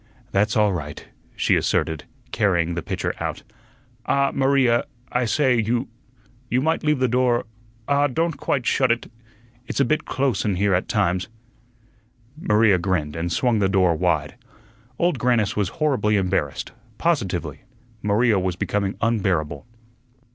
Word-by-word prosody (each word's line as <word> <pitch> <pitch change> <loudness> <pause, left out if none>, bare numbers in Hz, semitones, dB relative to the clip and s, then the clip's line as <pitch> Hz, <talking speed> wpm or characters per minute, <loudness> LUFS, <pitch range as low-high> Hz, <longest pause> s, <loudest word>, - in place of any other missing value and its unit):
"That's 105 +2 +1
all 105 -2 +3
right," 75 -4 -6 0.3
she - - +2
asserted, 80 -1 0 0.3
carrying 85 -6 +1
the 85 - -3
pitcher - - -3
out. - - -4 0.6
"Ah 140 0 +2
Maria 135 -3 +3 0.3
I 125 0 +1
say, 125 +1 +2
you 120 +4 -1 0.6
you 125 - +2
might 160 +5 0
leave 150 -1 +2
the 130 0 +2
door 125 0 +1 0.4
ah, 145 0 +3
don't 165 +4 -1
quite 130 -4 -2
shut 130 -1 +2
it 120 0 -2 0.6
it's - - -3
a 140 - +4
bit 155 +5 0
close 135 -2 0
in 105 -3 0
here 100 +2 +1
at 90 - 0
times." 95 -4 0 1.1
Maria 105 - +3
grinned, 85 -5 -1
and 85 +1 -3
swung 120 +3 +1
the 95 -2 +2
door 95 -3 +3
wide. 80 - 0 0.6
Old 170 -6 +1
Grannis 115 -4 +1
was 100 -3 0
horribly 125 - +1
embarrassed; 90 -7 -1 0.3
positively, - - -1 0.4
Maria 105 +1 +2
was 90 -1 -1
becoming 100 +1 -1
unbearable. 95 -8 0
105 Hz, 145 wpm, -23 LUFS, 95-130 Hz, 1.1 s, a